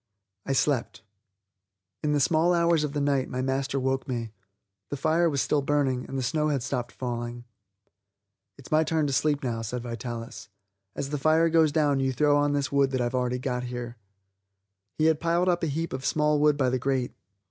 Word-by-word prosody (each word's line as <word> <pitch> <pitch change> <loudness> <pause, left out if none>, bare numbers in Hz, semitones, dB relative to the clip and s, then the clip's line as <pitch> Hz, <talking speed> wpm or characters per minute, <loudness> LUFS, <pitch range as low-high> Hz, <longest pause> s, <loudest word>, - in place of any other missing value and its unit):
I 135 - +1
slept. 115 -8 0 1.0
In 150 - 0
the 145 - +2
small 165 +5 +3
hours 170 -2 +3
of 145 -2 -3
the 150 - -1
night 140 -2 +1
my 130 0 -3
master 135 +1 -1
woke 130 0 -1
me. 120 -4 -3 0.6
The 145 - -4
fire 160 +4 +2
was 140 -3 0
still 150 - +1
burning, 135 -3 0
and 135 - -5
the 130 - -1
snow 150 +5 0
had 140 -5 0
stopped 125 -2 -3
falling. 120 -1 -5 1.1
"It's 135 - -14
my 155 +1 +4
turn 160 -1 0
to 140 - -1
sleep 145 +1 +1
now," 115 -3 -2
said 120 +2 -4
Vitalis; 115 0 -6 0.5
"as 140 0 -4
the 150 - -2
fire 160 +3 +3
goes 160 -2 +4
down 145 -2 +2
you 135 0 +1
throw 145 +3 +3
on 145 0 +2
this 140 -1 -1
wood 140 -1 +3
that 130 -1 -2
I've 120 0 0
got 130 - 0
already 125 0 -2
here." 120 -1 -6 1.0
He 155 - +2
had 160 -1 +3
piled 170 +2 +1
up 175 -1 +2
a 165 - 0
heap 160 +3 -3
of 130 0 -4
small 150 +1 +2
wood 150 -1 +3
by 130 -3 +1
the 130 - 0
grate. 130 -1 -1
140 Hz, 200 wpm, -27 LUFS, 125-150 Hz, 1.1 s, my